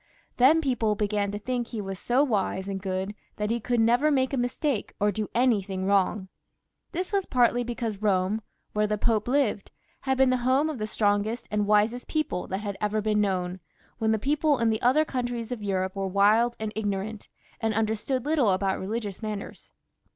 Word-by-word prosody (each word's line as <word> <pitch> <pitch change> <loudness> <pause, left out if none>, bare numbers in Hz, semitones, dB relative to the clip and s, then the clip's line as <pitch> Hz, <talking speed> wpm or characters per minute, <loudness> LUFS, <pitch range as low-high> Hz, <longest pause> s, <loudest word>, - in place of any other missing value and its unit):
Then 285 +6 +6
people 240 -7 +1
began 205 -1 0
to 205 - -3
think 245 +2 -2
that - - -19
he 225 - -3
was 195 -2 -5
so 250 +4 +2
wise 200 -6 -1
and 195 -1 -4
good 190 +1 -3 0.2
that 210 +1 -2
he 235 - 0
could 240 +1 0
never 240 +6 +4
make 265 -2 +1
a - - +2
mistake 245 0 -1
or 205 +1 +3
do 210 +1 -3
anything 200 -6 +1
wrong. 195 0 +1 0.6
This 365 +3 -4
was 395 -2 +1
partly 245 -1 +3
because 230 -3 -3
Bome, 200 +1 +1 0.3
where 210 0 +1
the 210 0 -1
Pope 220 0 +1
lived, 250 -6 +1 0.4
was 265 0 +2
the 255 -1 +4
home 260 +5 +2
of 280 - -7
the 215 - -2
strongest 210 +2 0
and 210 -1 0
wisest 215 +4 +2
people 310 - -2
that 190 +2 -3
had 200 -2 -4
ever 210 +1 0
been 210 0 +1
known, 185 -2 -1 0.4
and 220 0 +2
the 220 - +2
people 290 +5 +1
in 230 -1 +2
the 220 - -1
other 275 +6 +4
countries 245 -4 -3
of 245 -3 -4
Europe 190 -2 -1
were 195 0 -2
wild 210 +5 +3
and 220 -1 -4
ignorant, 205 0 -3 0.3
and 220 -2 -1
understood 225 +4 -1
Uttle 280 -10 +2
about 190 0 -1
religious 205 0 -4
matters. 215 -2 -6
220 Hz, 195 wpm, -27 LUFS, 205-245 Hz, 0.6 s, Then